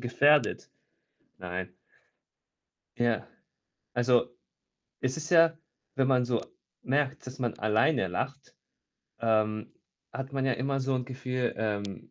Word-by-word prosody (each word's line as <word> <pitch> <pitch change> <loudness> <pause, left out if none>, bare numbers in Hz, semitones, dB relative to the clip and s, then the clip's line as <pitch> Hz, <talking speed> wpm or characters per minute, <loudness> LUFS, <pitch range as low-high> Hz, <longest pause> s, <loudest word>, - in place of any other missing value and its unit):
gefährdet. 145 +5 +3 0.7
Nein. 90 0 -5 1.3
Ja. 120 -3 +1 0.7
Also, 120 0 +3 0.7
es 130 +2 -1
ist 155 +1 -5
ja 165 -1 +6 0.4
wenn 135 -2 +2
man 125 -2 +4
so 120 -2 0 0.4
merkt, 135 0 0
dass 130 +1 -8
man 120 -3 0
alleine 110 +2 +2
lacht, 130 +10 -4 0.7
ähm, 110 -1 +1 0.4
hat 135 0 -5
man 135 - 0
ja 135 - +2
immer 135 +3 -1
so 135 +1 0
'n 125 -1 -1
Gefühl: 125 -1 -2
„Ähm 100 -3 -3
125 Hz, 120 wpm, -29 LUFS, 110-135 Hz, 1.3 s, ja